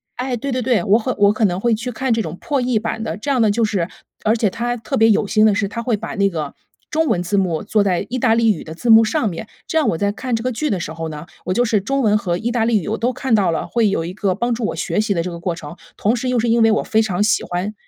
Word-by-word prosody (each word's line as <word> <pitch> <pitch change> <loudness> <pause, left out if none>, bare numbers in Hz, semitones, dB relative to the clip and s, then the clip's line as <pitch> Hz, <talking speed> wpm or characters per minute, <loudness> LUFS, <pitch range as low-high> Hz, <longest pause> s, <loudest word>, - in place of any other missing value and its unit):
哎， 250 -1 -2
对 275 +4 -4
对 255 - -1
对， 245 -1 +1
我 215 +2 +4
会 255 +3 -2
我 200 0 +5
和 - - +2
可 215 0 +1
能 180 -1 0
会 235 +2 +1
去 240 +3 -3
看 260 +1 -1
这 225 - +1
种 165 -2 -6
破 280 -3 -1
译 245 -2 +1
版 225 0 -3
的。 170 -4 -4
这 250 +7 -5
样 255 -3 +2
呢， 215 - +4
就 225 +2 +2
是 190 -5 -1 0.4
而 220 +2 +2
且 215 -3 +2
它 240 +2 -2
特 225 - -4
别 225 +1 +5
有 210 0 +3
心 215 +1 +3
的 205 - +3
是 200 - 0
它 235 +3 -5
会 235 -3 0
把 225 +2 -6
那 200 -1 +2
个 155 -5 -4 0.4
中 320 0 +1
文 180 -7 +1
字 200 +3 -1
幕 175 -5 0
做 210 -2 +2
在 190 0 0
意 255 +1 -3
大 225 -3 +3
利 230 -1 +4
语 175 - -4
的 160 0 -9
字 235 +5 +1
幕 225 0 +8
上 230 +1 0
面。 180 +5 -7 0.2
这 320 - +1
样 305 - +1
我 165 - -1
在 200 +2 0
看 245 +2 -3
这 225 - -3
个 255 - 0
剧 300 +6 -2
的 190 - 0
时 160 -1 -5
候 165 0 -5
呢， 150 +1 -7 0.2
我 185 - 0
就 245 - +3
是 215 -3 +1
中 275 +5 -1
文 210 -1 +3
和 175 -3 -1
意 235 +5 -2
大 230 -2 +1
利 230 -2 +3
语， - - -7
我 220 - -1
都 245 +2 +1
看 260 -1 -2
到 195 -5 +3
了， 165 - -1
会 225 -4 +1
有 165 -4 -1
一 180 - -5
个 195 -3 -1
帮 240 +3 -1
助 230 0 -4
我 - - -2
学 210 - -1
习 205 -3 -1
的 165 - 0
这 180 - -4
个 170 - -7
过 170 -1 -2
程。 155 0 -9 0.2
同 220 +4 +1
时 250 +2 -2
又 250 - +1
是 230 +1 0
因 230 0 +3
为 225 0 +5
我 215 - +1
非 220 0 +2
常 205 -2 0
喜 210 - +2
欢 180 +4 -3
220 Hz, 350 characters per minute, -19 LUFS, 195-235 Hz, 0.4 s, 幕